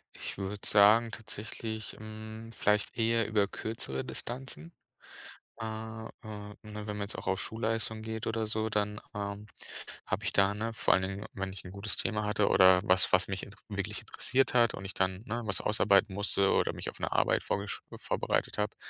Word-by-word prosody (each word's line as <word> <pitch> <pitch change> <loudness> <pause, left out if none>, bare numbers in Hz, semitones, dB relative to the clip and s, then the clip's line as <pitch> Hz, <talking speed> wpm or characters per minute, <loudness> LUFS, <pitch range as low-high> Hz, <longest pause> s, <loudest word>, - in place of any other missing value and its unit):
Ich - - -5
würde 100 +1 -2
sagen 110 +3 +6
tatsächlich, 110 0 -4
hm, 110 +1 -8
vielleicht 105 -1 +1
eher 115 -1 +3
über 105 -2 +2
kürzere 100 -11 -3
Distanzen. 120 - -5 0.9
Äh, 115 - -3
äh, 110 0 -5 0.2
ne, 105 -1 -8
wenn 105 -1 -6
man - - -4
jetzt 100 +1 -3
auch - - -7
auf 95 - +1
Schulleistung 110 0 0
geht 110 0 -4
oder 110 0 0
so, 110 +1 0
dann, 105 0 0 0.2
ähm, 100 +1 -4 0.6
habe - - -2
ich - - 0
da, 100 0 +4
ne, 110 +2 -3
vor - - +3
allen 95 - +3
Dingen, 100 +2 -4
wenn 95 -1 -4
ich 95 - -9
'n 90 - -8
gutes 100 +1 -2
Thema 105 -2 -1
hatte 105 -1 +2
oder 95 -1 +7
was, 95 -2 +5
was - - +4
mich 95 -1 -2
int 100 - -10
wirklich 100 0 -2
interessiert 130 +4 +1
hat 120 -3 +5
und 95 - -8
ich 95 - -5
dann, 95 +1 -1
ne, 115 +2 -3
was 105 -3 +1
ausarbeiten 105 -1 +3
musste 100 0 +2
oder - - +2
mich - - -5
auf - - -14
'ne - - -2
Arbeit - - +3
vorgesch 100 0 -2 0.2
vorbereitet - - -1
habe, 105 0 -1
105 Hz, 190 wpm, -31 LUFS, 100-110 Hz, 0.9 s, oder